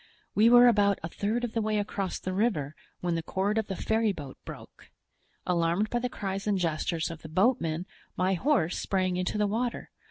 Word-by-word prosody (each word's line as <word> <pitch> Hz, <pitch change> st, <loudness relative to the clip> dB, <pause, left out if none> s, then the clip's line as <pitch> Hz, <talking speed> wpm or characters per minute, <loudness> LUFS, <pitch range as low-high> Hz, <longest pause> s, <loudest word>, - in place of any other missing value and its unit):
"We 220 Hz, +2 st, +5 dB
were 245 Hz, +1 st, +8 dB
about 205 Hz, -4 st, +4 dB
a 165 Hz, -, -3 dB
third 215 Hz, +7 st, -2 dB
of 240 Hz, -, -3 dB
the 225 Hz, -, 0 dB
way 215 Hz, 0 st, 0 dB
across 200 Hz, -2 st, -2 dB
the 185 Hz, -, -4 dB
river 185 Hz, -, 0 dB, 0.3 s
when 175 Hz, -1 st, 0 dB
the 165 Hz, -, -1 dB
cord 200 Hz, +5 st, 0 dB
of 220 Hz, -, -3 dB
the 195 Hz, -, -3 dB
ferryboat 205 Hz, -11 st, -1 dB
broke. -, -, -11 dB, 0.6 s
Alarmed 175 Hz, +4 st, +1 dB
by 240 Hz, -, +1 dB
the 250 Hz, +1 st, -2 dB
cries 195 Hz, -3 st, -4 dB
and 205 Hz, -2 st, +2 dB
gestures 165 Hz, -1 st, -1 dB
of 165 Hz, -, -9 dB
the 155 Hz, -, -9 dB
boatmen, 175 Hz, -3 st, +1 dB, 0.3 s
my 185 Hz, +1 st, +2 dB
horse 190 Hz, -, +1 dB
sprang 185 Hz, -2 st, 0 dB
into 180 Hz, +3 st, -1 dB
the 210 Hz, -, +2 dB
water. 230 Hz, +4 st, -2 dB
195 Hz, 195 wpm, -28 LUFS, 175-220 Hz, 0.6 s, were